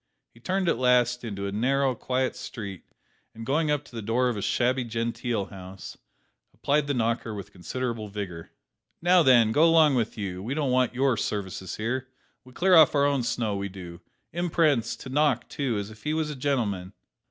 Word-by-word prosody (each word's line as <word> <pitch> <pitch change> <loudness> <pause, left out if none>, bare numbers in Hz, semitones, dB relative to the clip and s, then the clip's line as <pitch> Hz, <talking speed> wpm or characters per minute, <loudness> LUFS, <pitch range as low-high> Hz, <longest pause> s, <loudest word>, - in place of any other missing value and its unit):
He 115 - -19
turned 185 +7 -1
at 145 - +1
last 125 -1 +3
into 100 -4 -4
a 100 - -3
narrow, 135 +5 +1
quiet 130 +2 -1
street, 100 -5 -7 0.5
and 115 0 -8
going 150 +4 +1
up 145 -1 0
to - - -15
the 115 - -4
door 120 +4 +1
of 120 - -2
a 105 - -4
shabby 125 +5 +1
genteel 115 -1 -2
house, 95 -1 -9 0.6
applied 145 0 +1
the 145 - 0
knocker 115 -1 -1
with 100 -3 -8
considerable 115 +5 -4
vigour. 100 -5 -6 0.5
"Now 175 +1 +5
then, 120 -6 +5
go 150 +8 +4
along 165 -3 +6
with 115 -3 -1
you; 95 -3 -4
we 120 +8 -3
don't 145 -4 0
want 125 -1 +2
your 130 -2 +2
services 95 -3 -3
here; 125 +4 -2 0.4
we 130 - -16
clear 185 +8 +2
off 155 -2 +7
our 140 0 +4
own 140 -2 +2
snow, 115 -3 -1
we 100 0 -3
do. 90 -2 -10 0.3
Imprence! 155 -9 +1
to 130 - -10
knock, 150 +3 +1
too, 130 -6 -2
as 100 +1 -4
if 110 -1 -14
he 150 +1 -1
was 155 -1 -1
a - - -6
gentleman!" 110 -9 -1
120 Hz, 195 wpm, -26 LUFS, 105-140 Hz, 0.6 s, off